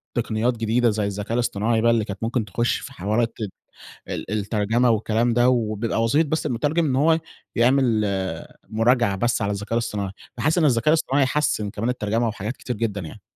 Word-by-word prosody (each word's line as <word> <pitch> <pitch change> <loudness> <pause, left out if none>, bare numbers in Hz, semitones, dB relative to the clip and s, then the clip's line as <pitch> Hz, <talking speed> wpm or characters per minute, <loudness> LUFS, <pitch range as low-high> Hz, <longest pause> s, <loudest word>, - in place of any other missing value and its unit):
تقنيات 115 +1 0
جديدة 115 +2 +2
زي 105 -1 -1
الذكاء 100 +2 -4
الإصطناعي 115 -1 +1
بقى 115 +1 +4
اللي 115 -2 +1
كانت 100 +1 -6
ممكن 115 0 0
تخش 120 +4 0
في 140 - -9
حوارات 115 +2 0 0.7
ال - - -5
الترجمة 110 +3 +1
والكلام 115 +2 +1
ده 120 +1 +4
وبيبقى 115 -2 0
وظيفة 145 +7 +2
بس 160 +1 -1
المترجم 150 +5 0
إن 135 -4 +1
هو 160 +4 +4 0.4
يعمل 120 -2 +3 0.7
مراجعة 115 -1 +2
بس 120 +4 0
على 100 0 0
الذكاء 105 +2 -4
الإصطناعي. 105 -4 -1 0.3
باحس 155 +9 +1
إن 165 - +4
الذكاء 120 -1 +3
الإصطناعي 145 -3 +3
حسِّن 130 -6 0
كمان 110 +4 -3
الترجمة 115 -1 0
وحاجات 110 +2 -4
كتير 125 - -4
جدًا 105 -2 -2
يعني. 80 - -9
115 Hz, 175 wpm, -23 LUFS, 105-125 Hz, 0.7 s, بقى